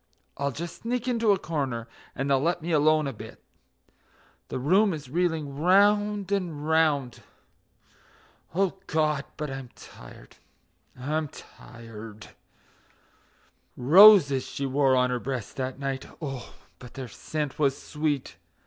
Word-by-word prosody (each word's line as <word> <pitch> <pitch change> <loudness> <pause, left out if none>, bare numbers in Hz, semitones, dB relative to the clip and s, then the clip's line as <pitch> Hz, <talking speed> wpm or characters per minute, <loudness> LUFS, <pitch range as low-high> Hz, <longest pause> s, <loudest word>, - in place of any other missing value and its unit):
I'll 140 0 -1
just 170 +6 -7
sneak 245 +1 -2
into 230 -3 +2
a 200 - +3
corner 135 -9 -3 0.3
and 135 - -2
they'll 135 -1 +3
let 170 +1 0
me 170 - -3
alone 155 0 +3
a 135 - -3
bit; 110 - -11 1.1
The - - -4
room 185 +8 +3
is 140 -4 -10
reeling 160 -4 -1
round 205 +3 +3
and 170 -7 -2
round... 155 -6 +1 1.3
O 195 0 0
God! 155 -3 0
but 150 -3 -4
I'm 135 -2 -7
tired, - - -14 0.6
I'm 155 +4 -2
tired.... 115 -5 -12 1.5
Roses 150 -1 +7
she 140 - -4
wore 135 0 +2
on 125 0 +2
her 125 - -1
breast 125 -4 -5
that 130 -1 -3
night. 135 -1 -4
Oh, 135 -6 -7 0.2
but 125 -2 -13
their 130 -2 -6
scent 150 +6 -5
was 140 -2 +2
sweet! 150 -3 -3
145 Hz, 130 wpm, -26 LUFS, 130-170 Hz, 1.5 s, Roses